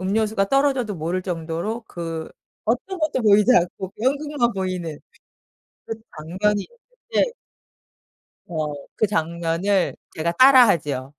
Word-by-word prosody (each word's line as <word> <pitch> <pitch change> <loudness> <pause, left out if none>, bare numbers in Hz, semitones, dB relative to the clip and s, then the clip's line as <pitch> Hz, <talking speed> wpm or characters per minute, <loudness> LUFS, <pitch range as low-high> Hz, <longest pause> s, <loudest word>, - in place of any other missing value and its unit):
음료수가 205 +1 +1
떨어져도 270 -7 +1
모를 170 +4 -2
정도로 175 +6 -3
그 165 -2 -5 0.4
어떤 260 - -1
것도 300 -6 0
보이지 210 +3 +5
않고 185 +1 0
연극만 280 -2 +1
보이는 180 -5 -3 0.9
그 225 - -3 0.2
장면이 190 +7 -1
있는데 475 0 -3 1.2
어 155 -3 -3 0.2
그 215 - +2
장면을 170 +1 0 0.2
제가 170 +2 0
따라 255 +4 +8
하지요. 145 -6 -1
195 Hz, 260 characters per minute, -23 LUFS, 170-245 Hz, 1.2 s, 따라